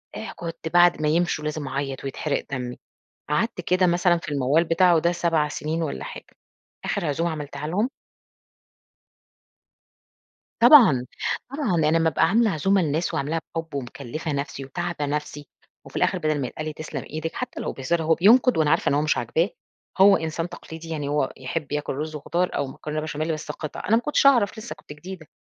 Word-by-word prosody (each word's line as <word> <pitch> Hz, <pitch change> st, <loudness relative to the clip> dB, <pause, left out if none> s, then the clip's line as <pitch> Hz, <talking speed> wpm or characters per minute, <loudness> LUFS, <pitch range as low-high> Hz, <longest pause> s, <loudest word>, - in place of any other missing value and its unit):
إيه 220 Hz, -, -6 dB
كنت 165 Hz, -1 st, -6 dB
بعد 175 Hz, 0 st, +4 dB
ما 150 Hz, -, +1 dB
يمشوا 165 Hz, 0 st, +1 dB
لازم 150 Hz, -1 st, -3 dB
أعيّط 135 Hz, 0 st, -3 dB
ويتحرق 140 Hz, +2 st, -2 dB
دمّي. 125 Hz, -2 st, -4 dB, 0.5 s
قعدت 180 Hz, +6 st, 0 dB
كده 180 Hz, +2 st, +2 dB
مثلًا 175 Hz, 0 st, +3 dB
في 165 Hz, -, -9 dB
الموّال 145 Hz, +4 st, +2 dB
بتاعه 170 Hz, +1 st, +4 dB
ده 170 Hz, +2 st, +2 dB
7 165 Hz, -3 st, +1 dB
سِنين 155 Hz, +3 st, -3 dB
ولا 145 Hz, -, -3 dB
حاجة، -, -, -8 dB, 0.6 s
آخِر 170 Hz, -, -1 dB
عزوم 150 Hz, +4 st, 0 dB
عملتها 150 Hz, -2 st, -5 dB
لهم 200 Hz, +9 st, 0 dB, 2.7 s
طبعًا، 230 Hz, -, +8 dB, 0.4 s
طبعًا. 275 Hz, -, -1 dB
أنا 160 Hz, 0 st, +3 dB
أمّا 165 Hz, 0 st, +3 dB
أبقى -, -, +2 dB
عاملة 225 Hz, +1 st, +3 dB
عزومة 195 Hz, +4 st, +2 dB
لناس 155 Hz, +2 st, -1 dB
وعاملاها 155 Hz, +4 st, -1 dB, 0.2 s
بحُب 165 Hz, -1 st, -4 dB
ومكلِّفة 140 Hz, +3 st, -5 dB
نفسي 140 Hz, -1 st, -4 dB
وتاعبة 170 Hz, +2 st, -3 dB
نفسي 145 Hz, 0 st, -4 dB, 0.4 s
وفي -, -, -14 dB
الآخر -, -, +2 dB
بَدَل 155 Hz, -2 st, 0 dB
ما 130 Hz, -, -1 dB
يتقال 155 Hz, -, -6 dB
لي 155 Hz, -, -4 dB
تسلم 155 Hz, +1 st, -6 dB
إيدك 160 Hz, +2 st, -4 dB
حتّى 250 Hz, -1 st, -5 dB
لو -, -, -3 dB
بهزار، 160 Hz, +5 st, -1 dB
هو 160 Hz, +1 st, +3 dB
بينقد 235 Hz, +6 st, +5 dB
وأنا 155 Hz, -2 st, +3 dB
عارفة 165 Hz, -, +2 dB
إن -, -, +1 dB
هو 145 Hz, -, +2 dB
مش 155 Hz, -, +1 dB
عاجباه. 160 Hz, -, 0 dB, 0.5 s
هو 195 Hz, +1 st, +7 dB
إنسان 160 Hz, +2 st, -3 dB
تقليدي، 165 Hz, -1 st, -10 dB
يعني 150 Hz, -3 st, -3 dB
هو 145 Hz, -2 st, 0 dB
يحِب 130 Hz, +2 st, -4 dB
ياكل 150 Hz, 0 st, -2 dB
رُز 155 Hz, +2 st, -4 dB
وخضار 170 Hz, +5 st, -1 dB
أو 140 Hz, -, -1 dB
مكرونة 150 Hz, +3 st, -5 dB
بشاميل 155 Hz, +1 st, -2 dB
بس 155 Hz, 0 st, -5 dB
قِطَع، 155 Hz, -, -7 dB
أنا 220 Hz, -, +4 dB
ما 230 Hz, -, +2 dB
كنتش 295 Hz, +2 st, +1 dB
أعرف 240 Hz, -8 st, +5 dB
لسّه 225 Hz, +2 st, -7 dB
كنت -, -, -12 dB
جديدة، 170 Hz, +1 st, -10 dB
160 Hz, 185 wpm, -24 LUFS, 145-175 Hz, 2.7 s, طبعًا